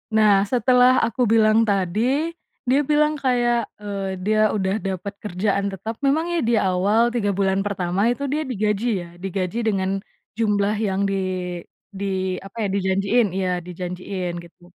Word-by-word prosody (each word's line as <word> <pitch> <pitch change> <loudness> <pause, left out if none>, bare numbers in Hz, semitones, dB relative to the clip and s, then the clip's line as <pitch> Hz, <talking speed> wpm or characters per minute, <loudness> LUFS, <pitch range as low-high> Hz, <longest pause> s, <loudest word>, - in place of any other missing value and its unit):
Nah, 210 -3 +5
setelah 250 +1 +4
aku 235 +3 -3
bilang 220 0 +5
tadi, 225 - 0 0.4
dia 270 +3 +4
bilang 300 +1 +2
kayak, 240 -5 +1
eee, 195 -2 -4
dia 215 0 +3
udah 190 -2 0
dapet 195 +1 -4
kerjaan 200 0 -1
tetap 210 +5 -6
memang 285 +4 +2
ya 340 - +1
di - - +2
awal, 205 +5 +2
3 220 -4 0
bulan 195 0 +1
pertama 195 +1 0
itu 260 +4 -1
dia 290 +3 -1
digaji 215 -5 -1 0.2
ya, - - -12
digaji 190 +1 -3
dengan 195 -4 0 0.4
jumlah 210 -1 +1
yang 200 -2 0
di 195 - 0 0.8
di 200 +1 -4 0.4
apa 195 +4 -12
ya, - - +1
dijanjiin, 200 +4 +2
iya 190 -1 0
dijanjiin 180 +1 -5
gitu. 170 0 -18
205 Hz, 150 wpm, -22 LUFS, 195-240 Hz, 0.8 s, Nah